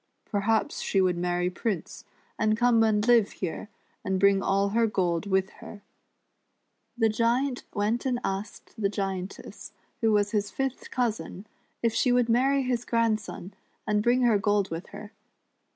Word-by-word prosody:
Perhaps 215 +2 0
she 195 - 0
would 185 -2 +2
marry 175 +1 -1
Prince, 190 -1 -4 0.3
and 215 0 +2
come 240 -1 +4
and 215 0 +2
live 235 -4 +4
here, 185 +3 -5 0.3
and 190 0 -1
bring 200 0 +4
all 200 +1 +1
her 230 +2 +2
gold 180 -3 -1
with 190 0 +1
her." 205 -2 -11 1.1
The 225 -2 +3
Giant 240 +4 0
went 220 +5 0
and 245 -2 0
asked 200 +3 -5
the 200 - +2
Giantess, 195 -2 -5 0.3
who 225 -2 +2
was 205 -1 +2
his 205 -2 0
fifth 270 -1 -4
cousin, 225 -5 -3 0.4
if 230 -1 +2
she 250 +2 +2
would 245 -1 +2
marry 270 +4 +3
his 245 -2 -1
grandson, 220 -5 -1 0.3
and 210 -1 +1
bring 245 +3 +2
her 225 -4 +4
gold 205 -2 +1
with 165 +3 -5
her. 210 -1 -10
210 Hz, 155 wpm, -27 LUFS, 195-235 Hz, 1.1 s, come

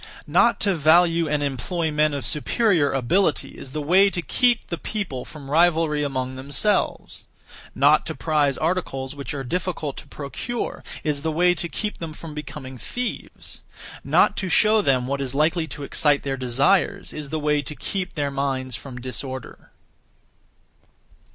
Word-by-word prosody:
Not 235 -3 +3
to 200 -2 +3
value 165 +1 +4
and 150 -1 0
employ 155 +5 -1
men 150 0 +2
of 140 - -4
superior 165 -1 +2
ability 150 +7 +1
is - - -10
the 150 +1 -3
way 190 +6 +5
to 175 -2 -4
keep 245 +3 +2
the 170 - -5
people 190 - -4
from 140 -3 -10
rivalry 160 -2 +3
among 130 -3 -2
themselves; 140 +10 -1 0.5
not - - +5
to - - -4
prize 150 -4 +1
articles 155 -6 -2
which 140 0 -5
are 135 - -4
difficult 165 -1 -3
to - - -9
procure 225 - -5 0.2
is 150 -2 -1
the 160 +1 -1
way 175 +3 +4
to 170 -1 -5
keep 210 +4 -4
them 165 -2 -5
from 155 0 -9
becoming 135 -4 -8
thieves; 245 - -6 0.4
not - - +4
to 190 - -2
show 215 +3 +4
them 130 -8 +2
what 140 +2 -2
is 135 -1 -3
likely 160 +2 +2
to 145 +1 -7
excite 145 +1 +2
their 135 -1 -1
desires 135 +11 +1
is 150 -2 -6
the 155 - -2
way 150 -1 +1
to 145 +2 -8
keep 185 +3 -4
their 145 -2 -1
minds 135 -2 -2
from 125 -1 -8
disorder. 130 +1 -7
150 Hz, 165 wpm, -23 LUFS, 135-175 Hz, 0.5 s, way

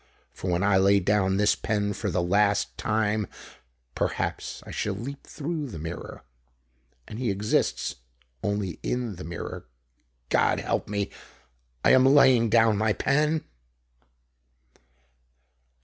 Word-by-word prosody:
For 95 - -5
when 90 +1 +1
I 100 -1 +4
lay 100 +1 +5
down 95 0 +1
this 105 0 +4
pen, 105 -1 -1
for 100 - -3
the 85 - 0
last 100 +3 +2
time, 110 -1 0 0.7
perhaps, - - -3
I - - -9
shall 105 -2 -2
leap 135 +8 -7
through 155 0 -4
the 105 - -8
mirror. 80 +2 -7 0.8
And 110 - -7
he 125 -3 0
exists 100 -7 0 0.4
only 100 -4 -2
in 120 -6 -2
the 90 - -7
mirror. 85 -5 -7 0.6
God - - +2
help - - -2
me! 100 -1 -2 0.7
_I - - +6
am 130 - +6
laying 130 -4 +5
down 110 -2 +4
my 110 0 +2
pen! 150 +5 +1
105 Hz, 130 wpm, -26 LUFS, 95-115 Hz, 0.8 s, I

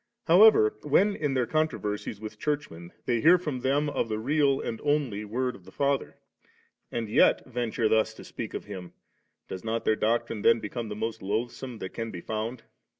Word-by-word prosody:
However, 175 - +7
when 195 +8 +3
in 145 -3 -1
their 125 -2 +2
contro 155 +2 0
versies 105 0 -4
with 105 0 -8
Churchmen 90 - -3
they 120 -2 +1
hear 170 +3 +7
from 150 -7 -4
them 140 +4 +1
of 145 -5 -1
the 110 - -1
real 140 +3 +2
and 115 - -4
only 145 -8 0
Word 125 +4 -2
of 95 - -15
the 95 - -14
Father, 140 +3 -1 0.7
and 115 -2 -2
yet 105 - +4
venture 120 -3 -1
thus 110 0 +2
to - - -11
speak 110 - -7
of - - -5
Him, 95 -4 -8 0.5
does 95 - -7
not 115 +1 -2
their 110 - +3
doctrine 110 0 0
then 115 +2 +5
become 115 +1 -5
the 105 - -4
most 110 +1 -4
loathsome 115 +5 -3
that 95 -3 -7
can 115 0 -4
be 90 - -7
found? 110 +4 -4
115 Hz, 195 wpm, -28 LUFS, 110-140 Hz, 0.7 s, However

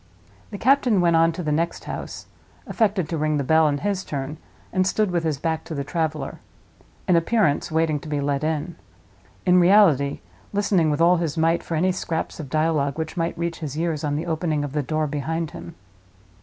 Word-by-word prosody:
The 205 - -6
captain 250 -3 +3
went 170 -2 +3
on 165 0 +4
to 180 - -5
the 155 - -1
next 165 +3 -1
house; - - -6 0.4
affected 200 -7 0
to 165 -1 -3
ring 155 0 +1
the 140 - 0
bell, 160 +3 +4
in 145 -1 +1
his 195 +3 -2
turn, 145 +2 -5 0.3
and 185 -1 +2
stood 210 0 +1
with 170 -2 0
his 155 -3 0
back 160 +2 -2
to 160 - -6
the 140 - -2
traveler—in 155 +3 -4
appearance, 170 -3 +1
waiting 160 -2 +1
to 150 - -10
be 145 -1 -1
let 140 0 -1
in; 160 +2 -2 0.7
in 180 0 +5
reality, 175 -7 +4 0.3
listening 200 -5 +2
with 150 +1 0
all 175 +2 +5
his 165 -2 -2
might 165 +1 +2
for 165 - -4
any 185 +4 +2
scraps 165 -3 -3
of 145 -4 -6
dialogue 155 -2 0
which 160 -1 -4
might 165 -1 -2
reach 170 -1 -3
his 150 -3 -5
ears 160 -2 -1
on 145 -1 -1
the 155 +3 -2
opening 160 -3 -1
of 145 - -4
the 150 - 0
door 155 +3 -1
behind 150 +2 -3
him. 170 - -9
160 Hz, 200 wpm, -23 LUFS, 150-175 Hz, 0.7 s, in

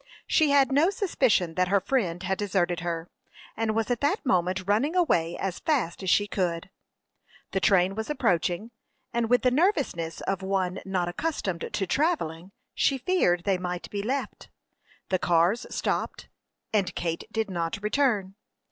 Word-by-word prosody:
She 315 -3 +3
had 280 -2 +4
no 295 +6 +4
suspicion 260 - +1
that 185 +2 +1
her 200 +2 +3
friend 190 -5 -1
had 190 0 -1
deserted 180 -4 0
her, 170 -1 -3 0.5
and 220 -1 -1
was 225 +1 0
at 240 - -1
that 295 +7 0
moment 185 -3 +1
running 245 - +1
away 175 - +2
as 190 -3 -3
fast 250 - 0
as 190 - -2
she 205 - +4
could. 180 -3 -2 0.8
The 190 - 0
train 190 -1 +3
was 220 +2 -4
approaching, 180 - 0 0.4
and 235 -1 0
with 245 0 +3
the 250 - +4
nervousness 265 - 0
of 195 0 -2
one 190 -1 -1
not 185 -2 -1
accustomed 185 - -3
to 195 - -1
travelling, 185 - -1 0.2
she 275 - +2
feared 245 - +1
they 195 -2 +1
might 180 -1 -5
be 205 - -2
left. 265 +6 -4 0.6
The 185 - +1
cars 175 +8 +2
stopped, - - -2 0.4
and 190 -4 +1
Kate 165 -1 -3
did 220 -3 -2
not 170 -2 -2
return. 210 -5 +1
195 Hz, 160 wpm, -27 LUFS, 175-250 Hz, 0.8 s, had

